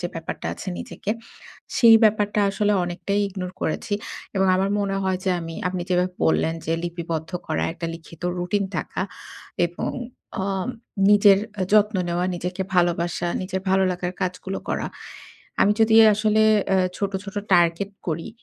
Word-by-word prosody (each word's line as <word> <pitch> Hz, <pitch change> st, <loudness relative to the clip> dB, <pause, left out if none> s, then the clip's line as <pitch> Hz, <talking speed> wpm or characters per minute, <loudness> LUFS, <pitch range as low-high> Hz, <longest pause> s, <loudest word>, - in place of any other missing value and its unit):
যে 175 Hz, -, -1 dB
ব্যাপারটা 165 Hz, 0 st, -5 dB
আছে 195 Hz, -, -7 dB
নিজেকে। 205 Hz, -, -5 dB, 0.7 s
সেই 230 Hz, -2 st, +8 dB
ব্যাপারটা 210 Hz, -1 st, +2 dB
আসলে 205 Hz, +1 st, +1 dB
অনেকটাই 200 Hz, +3 st, -2 dB
ইগনোর 185 Hz, -2 st, -6 dB
করেছি। 205 Hz, +6 st, -1 dB, 0.4 s
এবং 190 Hz, 0 st, +3 dB
আমার 195 Hz, +1 st, +1 dB
মনে 195 Hz, -1 st, -1 dB
হয় 190 Hz, -1 st, 0 dB
যে 190 Hz, -, +2 dB
আমি, 165 Hz, 0 st, -6 dB
আপনি 180 Hz, -1 st, -3 dB
যেভাবে 180 Hz, 0 st, +1 dB
বললেন 160 Hz, 0 st, +2 dB
যে, 160 Hz, -, +1 dB
লিপিবদ্ধ 165 Hz, -1 st, -4 dB, 0.2 s
করা, -, -, 0 dB
একটা 170 Hz, -1 st, -5 dB
লিখিত 165 Hz, 0 st, -13 dB, 0.2 s
রুটিন 190 Hz, +3 st, 0 dB
থাকা -, -, -3 dB, 0.6 s
এবং 175 Hz, 0 st, -4 dB, 0.5 s
আম 195 Hz, +3 st, -2 dB, 0.4 s
নিজের 205 Hz, -1 st, +7 dB, 0.2 s
আ -, -, +2 dB
যত্ন 210 Hz, -1 st, +4 dB
নেওয়া, 175 Hz, +1 st, 0 dB
নিজেকে 180 Hz, +2 st, -3 dB
ভালোবাসা, 175 Hz, 0 st, +1 dB
নিজের 190 Hz, 0 st, -3 dB
ভালো 190 Hz, 0 st, +4 dB
লাগার 180 Hz, 0 st, -3 dB
কাজগুলো 185 Hz, +1 st, -3 dB
করা। -, -, -1 dB, 0.7 s
আমি 205 Hz, -, +5 dB
যদি 220 Hz, 0 st, +5 dB, 0.2 s
আসলে 215 Hz, +1 st, +2 dB, 0.3 s
এ -, -, +4 dB, 0.2 s
ছোট, 200 Hz, -1 st, -1 dB
ছোট 200 Hz, +1 st, -9 dB, 0.2 s
টার্গেট 175 Hz, +2 st, +3 dB, 0.2 s
করি 165 Hz, 0 st, -3 dB
185 Hz, 155 wpm, -23 LUFS, 175-200 Hz, 0.7 s, সেই